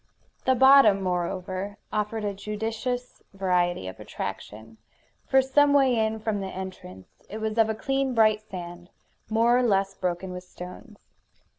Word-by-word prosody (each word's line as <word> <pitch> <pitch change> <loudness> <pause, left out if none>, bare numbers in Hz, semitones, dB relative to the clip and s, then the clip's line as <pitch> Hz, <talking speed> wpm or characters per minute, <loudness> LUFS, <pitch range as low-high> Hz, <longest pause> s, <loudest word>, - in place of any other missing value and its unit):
The 260 - +4
bottom, 260 -6 +6
moreover, 185 +2 -3 0.2
offered 210 +1 -2
a 205 - -1
judicious 220 +5 -4
variety 180 - 0
of 95 - -8
attraction. 110 +1 -7 0.5
For 265 0 +4
some 285 +2 +4
way 265 -3 +4
in 220 -1 0
from 215 -1 -2
the 195 - -4
entrance 185 - -9
it 215 - -6
was 220 -1 -3
of 220 -1 +4
a 220 - -1
clean 270 +2 -1
bright 215 -1 +4
sand, 175 -3 -9 0.4
more 230 +2 +3
or 250 - +3
less 195 -4 +1
broken 185 0 -3
with 180 0 -7
stones. 180 +5 -12
210 Hz, 150 wpm, -26 LUFS, 185-230 Hz, 0.5 s, bottom